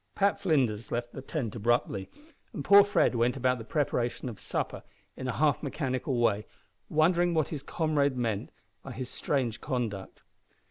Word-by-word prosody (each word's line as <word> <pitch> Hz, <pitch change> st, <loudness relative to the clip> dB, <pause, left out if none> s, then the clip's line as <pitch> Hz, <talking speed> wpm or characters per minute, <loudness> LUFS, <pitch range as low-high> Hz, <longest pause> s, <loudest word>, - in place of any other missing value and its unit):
Pat 200 Hz, 0 st, +2 dB
Flinders 130 Hz, -, +1 dB
left 120 Hz, 0 st, -3 dB
the 135 Hz, -, -6 dB
tent 130 Hz, -5 st, -4 dB
abruptly, 110 Hz, -3 st, 0 dB, 0.4 s
and 140 Hz, -, -5 dB
poor 200 Hz, 0 st, +9 dB
Fred 205 Hz, -8 st, +2 dB
went 120 Hz, +2 st, +1 dB
about 125 Hz, -1 st, +1 dB
the -, -, -6 dB
preparation 125 Hz, -2 st, -1 dB
of 110 Hz, -, -9 dB
supper -, -, -3 dB, 0.3 s
in 130 Hz, -, -5 dB
a 125 Hz, -, -1 dB
half 150 Hz, -1 st, +3 dB
mechanical 135 Hz, -3 st, -2 dB
way, 105 Hz, -3 st, +2 dB, 0.4 s
wondering 170 Hz, +2 st, +3 dB
what 155 Hz, -2 st, +1 dB
his 150 Hz, -4 st, -4 dB
comrade 145 Hz, -3 st, 0 dB
meant 115 Hz, -2 st, -1 dB, 0.3 s
by 135 Hz, -, -8 dB
his 125 Hz, +1 st, -5 dB
strange 125 Hz, -6 st, -1 dB
conduct. 115 Hz, -8 st, -4 dB
130 Hz, 165 wpm, -29 LUFS, 120-155 Hz, 0.4 s, poor